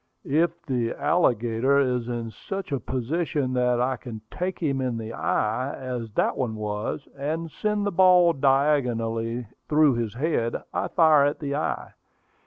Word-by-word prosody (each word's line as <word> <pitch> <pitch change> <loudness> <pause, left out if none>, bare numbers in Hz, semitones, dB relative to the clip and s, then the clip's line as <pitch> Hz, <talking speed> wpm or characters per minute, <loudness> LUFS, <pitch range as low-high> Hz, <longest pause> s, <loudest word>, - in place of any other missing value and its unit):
"If 165 +4 +1
the 120 -4 -1
alligator 120 -4 +2
is 125 -4 +1
in 120 -2 -4
such 195 - -6
a 140 - 0
position 130 +3 -2
that 125 -1 +2
I 130 +1 +1
can 115 -3 -8
take 180 +1 -3
him 140 -5 -1
in 125 -3 -1
the 115 0 -6
eye, 120 +5 -1
as 125 -3 -5
that - - +1
one 120 -4 -2
was, 105 +6 -4
and 155 +4 -3
send 210 +2 -1
the 205 - 0
ball 180 -2 +6
diagonally 125 -5 +1 0.2
through 150 -2 +5
his 115 -3 -3
head, 125 -4 0 0.2
I - - -1
fire 155 -4 +5
at 145 - 0
the 140 -2 -3
eye. 155 - -3
130 Hz, 160 wpm, -25 LUFS, 115-155 Hz, 0.2 s, ball